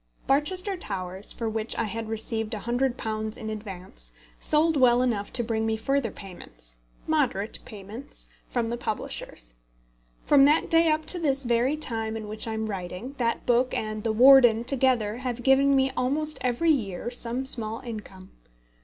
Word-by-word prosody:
Barchester 365 +8 +2
Towers, 190 - -3
for 230 - -3
which 220 0 -3
I - - +1
had 225 +1 -4
received 225 0 -2
£100 220 -1 -2
in 220 -2 -6
advance, 185 - -8 0.3
sold 315 +1 +2
well 250 -2 +4
enough 215 -5 -1
to 240 - +4
bring 220 -1 -1
me 220 0 0
further 270 +1 0
payments - - -9 0.3
moderate 255 -10 0
payments 215 +5 -8 0.2
from 235 -2 -1
the 240 - -2
publishers. - - -4 0.7
From 280 -2 +6
that 300 +3 +2
day 330 0 +6
up 310 0 0
to 360 - +5
this 275 -4 0
very 245 +4 +1
time 225 -6 -1
in 215 -1 -7
which 215 +2 -4
I 225 - -3
am 220 0 -2
writing, 195 +5 -6
that 235 -1 -1
book 245 +1 +2
and 215 -1 -3
The 225 - 0
Warden 240 -1 +7
together 245 -4 +1
have 245 -1 -4
given 275 +1 +4
me 265 0 +2
almost 300 +4 -1
every 255 +7 +2
year 225 - -2
some 245 +1 -2
small 225 -4 +1
income. 210 -5 -9
235 Hz, 160 wpm, -26 LUFS, 215-270 Hz, 0.7 s, Warden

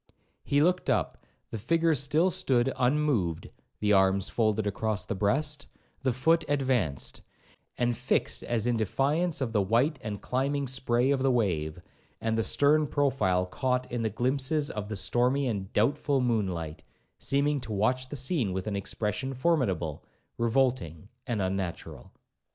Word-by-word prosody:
He 145 +1 +2
looked 180 +2 +1
up, - - -1 0.3
the 110 - -4
figure 165 +8 +2
still 150 +6 +2
stood 130 -7 +1
unmoved, 125 - 0 0.3
the 105 0 +2
arms 95 0 +3
folded 110 -2 +1
across 105 +1 -2
the - - -3
breast, 145 +9 0 0.3
the 135 -1 +1
foot 160 +7 +2
advanced, 125 - -1 0.6
and 120 -1 +1
fixed 125 +3 0
as 115 -2 -1
in 120 -1 +1
defiance 145 - 0
of 120 -4 -2
the 105 - +3
white 120 +9 +1
and 105 -2 -5
climbing 140 +2 -1
spray 130 0 +1
of 135 -2 +1
the 135 - +3
wave, 90 -10 0 0.4
and 110 0 -1
the 115 - +1
stern 150 +4 +3
profile 130 -12 +1
caught 125 +6 -2
in 120 -1 -2
the 110 - 0
glimpses 135 +6 0
of 105 -1 -5
the 110 - -3
stormy 120 +8 +1
and 100 -5 -3
doubtful 140 +5 +1
moon 115 -5 +1
light, 80 -3 -5 0.4
seeming 140 0 +1
to 115 - -6
watch 125 +6 0
the 145 - -5
scene 130 - 0
with 95 0 -3
an 105 -2 -2
expression 105 +6 -3
formidable, 120 - 0 0.3
revolting, 115 - 0 0.2
and 115 -6 -1
unnatural. 95 -2 -4
120 Hz, 155 wpm, -28 LUFS, 105-140 Hz, 0.6 s, arms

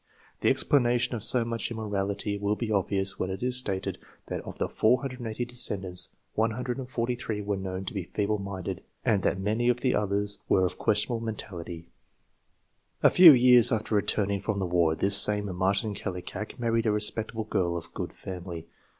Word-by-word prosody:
The - - +2
explana 125 -4 +2
tion 120 - -1
of 110 -3 -3
so 120 0 +1
much 115 0 -3
immorality 100 -2 -3
will 105 +1 0
be 110 0 -4
obvious 100 -1 -1
when 95 - -2
it 95 +4 -5
is 125 0 +1
stated 95 -7 -2 0.3
that - - -3
of - - -9
the - - -1
480 125 -1 -1
descendants, 95 -7 -1 0.2
143 120 0 -2
were 100 0 -1
known 95 0 -5
to 125 - -5
be 95 -4 -4
feeble 105 +2 -1
minded, 95 -2 -5 0.2
and 110 -5 +2
that - - 0
many 110 +5 0
of 125 0 +1
the 130 - +1
others 105 0 0
were 95 - +4
of 90 - -4
questionable 110 +3 +1
mentality. 85 -6 -6 1.2
A - - +7
few 175 -3 +10
years 125 -2 +6
after 110 0 -1
returning 100 -1 0
from 105 0 -2
the 95 - -1
war 85 -2 +2
this 100 +4 +5
same 105 -3 +4
Martin 100 +3 0
Kallikak 95 +1 -6
married 115 -2 0
a - - +3
respectable 110 +1 -1
girl 85 -5 -1
of 85 - -10
good - - -5
family. 90 -3 -7
105 Hz, 175 wpm, -27 LUFS, 95-115 Hz, 1.2 s, few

